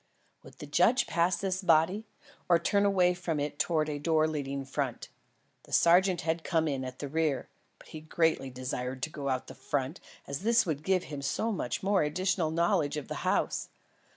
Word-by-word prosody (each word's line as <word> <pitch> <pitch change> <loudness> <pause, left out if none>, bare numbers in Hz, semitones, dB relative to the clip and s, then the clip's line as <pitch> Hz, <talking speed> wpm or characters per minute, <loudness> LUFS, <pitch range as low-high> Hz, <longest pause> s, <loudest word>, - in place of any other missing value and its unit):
Would - - -15
the - - -8
judge 190 - +3
pass 170 +1 +1
this 190 0 -2
body, 185 +5 +2 0.4
or 170 - +6
turn 200 +4 +1
away 185 -3 +3
from 175 -3 -3
it 145 0 -3
towards 155 -3 +1
a 150 -1 -3
door 155 +1 +2
leading 140 -3 -3
front? 135 -2 -3 0.6
The - - -18
sergeant 180 +1 +4
had 165 0 -1
come 160 -3 +1
in 135 -3 -2
at 130 0 -7
the 145 - -5
rear, 155 -2 -1 0.3
but - - -18
he 155 - -8
greatly 160 -3 0
desired 130 0 -5
to 160 - -2
go 140 -2 -4
out 130 -1 -3
front, 145 +4 -3 0.3
as 140 0 -4
this 230 +4 +3
would 155 -4 -2
give 185 +2 +1
him 145 -2 -7
so 145 +11 -1
much 125 - -3
additional 185 -2 +1
knowledge 160 -3 +1
of 150 - -6
the - - -3
house. - - 0
160 Hz, 185 wpm, -30 LUFS, 145-180 Hz, 0.6 s, or